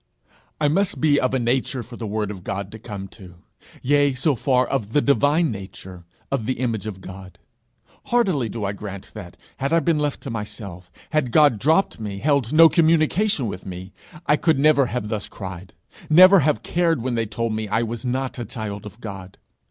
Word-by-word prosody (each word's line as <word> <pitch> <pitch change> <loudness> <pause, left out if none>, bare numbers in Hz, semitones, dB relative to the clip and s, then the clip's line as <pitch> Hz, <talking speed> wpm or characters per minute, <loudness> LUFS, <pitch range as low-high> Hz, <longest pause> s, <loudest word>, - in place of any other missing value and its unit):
I 150 - +2
must 190 +6 0
be 145 -2 +3
of 130 - +1
a - - +3
nature 125 +1 -1
for 120 +2 -11
the 115 -2 -6
word 105 0 -2
of 95 -3 -9
God 100 0 -4
to 110 - -10
come 100 -4 -7
to 90 -3 -14 0.5
yea, 145 0 +3
so 140 +4 +2
far, 130 0 +2
of 115 -5 -3
the - - +4
divine 145 +3 +2
nature, 95 -3 -9 0.3
of 125 -6 -1
the 130 - +1
image 115 -4 -2
of 95 -3 -7
God! 95 0 -11 0.7
Heartily 185 - +1
do 110 -2 -4
I 100 - -1
grant 100 -1 -8
that, 100 -5 -10 0.2
had 140 +1 -2
I 165 - +4
been 165 -2 +1
left 145 -1 -2
to 135 - -6
myself, 105 -5 -7 0.2
had 155 -6 0
God 145 -7 +4
dropped 160 - +2
me, 105 -3 -5
held 140 0 +1
no 165 +2 +8
communication 165 - +2
with 100 -3 -5
me, 95 +1 -8 0.3
I 150 - +3
could 160 -3 +2
never 140 -2 +4
have 120 -3 -3
thus 110 -1 -3
cried, 95 -2 -9 0.3
never 185 +5 +8
have 150 0 +1
cared 165 -7 0
when 130 -1 -1
they 115 -2 -1
told 115 +2 -2
me 110 0 -3
I 115 +3 0
was 115 0 -5
not 130 +1 -2
a - - -3
child 105 -3 -6
of 110 +3 -14
God. 95 -3 -8
120 Hz, 200 wpm, -22 LUFS, 100-145 Hz, 0.7 s, no